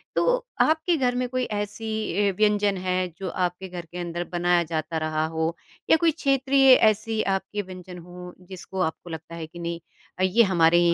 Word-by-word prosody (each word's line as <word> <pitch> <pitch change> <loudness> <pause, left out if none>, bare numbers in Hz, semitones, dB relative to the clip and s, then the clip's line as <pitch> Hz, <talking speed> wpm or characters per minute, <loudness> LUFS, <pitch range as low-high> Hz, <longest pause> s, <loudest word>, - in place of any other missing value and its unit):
तो - - +2 0.4
आपके 320 +2 +3
घर 250 -2 +1
में 250 0 0
कोई 255 0 -1
ऐसी 210 +1 -4 0.4
ऐ 200 - +2
व्यंजन 210 -2 +2
है 185 0 -1
जो 190 -2 -4
आपके 180 +2 -2
घर 175 -2 -7
के 175 +2 -11
अंदर 175 0 -3
बनाया 175 0 +2
जाता 160 0 -3
रहा 155 0 -1
हो, 160 +1 -2 0.3
या 320 - +7
कोई 330 0 +3
क्षेत्रीय 275 -2 +3
ऐसी 220 0 +2
आपके 195 +2 -2
व्यंजन 185 -1 -10
हो 180 +1 -10 0.2
जिसको 190 0 -7
आपको 165 +1 -3
लगता 160 +1 -8
है 160 -1 -6
कि 170 +2 -12
नहीं 170 0 -4 0.4
अ, - - +1
ये 210 +6 +5
हमारे 175 -3 +4
ही 175 0 +4
185 Hz, 190 wpm, -25 LUFS, 170-215 Hz, 0.4 s, या